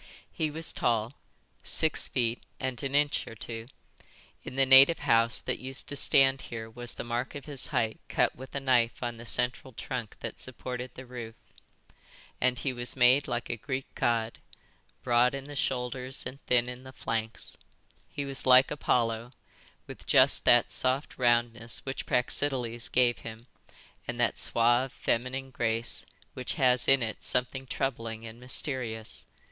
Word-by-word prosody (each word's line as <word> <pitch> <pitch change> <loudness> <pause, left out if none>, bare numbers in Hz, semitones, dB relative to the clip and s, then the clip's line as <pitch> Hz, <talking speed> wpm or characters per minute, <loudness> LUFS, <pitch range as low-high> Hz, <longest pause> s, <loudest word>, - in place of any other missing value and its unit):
He 155 - -1
was 160 +2 -2
tall, 115 0 0 0.5
six 160 - +4
feet 120 -2 -1 0.2
and 130 -2 -3
an 135 0 -3
inch 145 0 +2
or 115 - -9
two—in 115 +3 -12
the 135 0 +4
native 135 +5 +8
house 115 -4 +3
that - - -3
used 130 +1 -3
to 145 - -3
stand 135 -1 +4
here 110 -1 -6
was 120 +2 -4
the - - -5
mark 120 +3 -3
of 140 -2 -7
his 145 -3 -2
height 110 -1 -1
cut - - +1
with 130 +2 -11
a - - 0
knife 125 -3 +1
on 120 -1 -3
the 115 +1 -11
central 125 +2 -1
trunk 120 -2 -5
that - - -6
supported 125 0 -6
the 130 - -9
roof—and 125 +1 -7
he 130 +1 -2
was 120 0 -1
made 130 +2 +5
like 120 0 -3
a - - -1
Greek 130 +3 -5
god, 115 -1 0 0.6
broad 125 +1 +3
in 135 - -6
the 145 0 -9
shoulders 130 0 -2
and 135 +2 -8
thin 125 -1 +3
in 125 0 -7
the 130 0 -11
flanks; 115 -3 -3 0.5
he 140 - -4
was 135 -1 0
like 130 +1 +7
Apollo, 120 -5 0 0.5
with - - -11
just - - +5
that - - +5
soft 130 +3 -1
roundness 120 -1 0
which 135 0 -5
Praxiteles 125 -2 0
gave 125 -1 +3
him, 110 +1 -9 0.6
and - - -4
that - - +1
suave, 120 +3 +2
feminine 130 +3 -2
grace 115 -1 -2 0.3
which 125 - -4
has 130 -5 +3
in 135 -2 +5
it 110 -1 -5
something 130 +1 -1
troubling 115 -4 -3
and 115 +1 -10
mysterious. 125 -4 -2
125 Hz, 160 wpm, -29 LUFS, 115-135 Hz, 0.6 s, native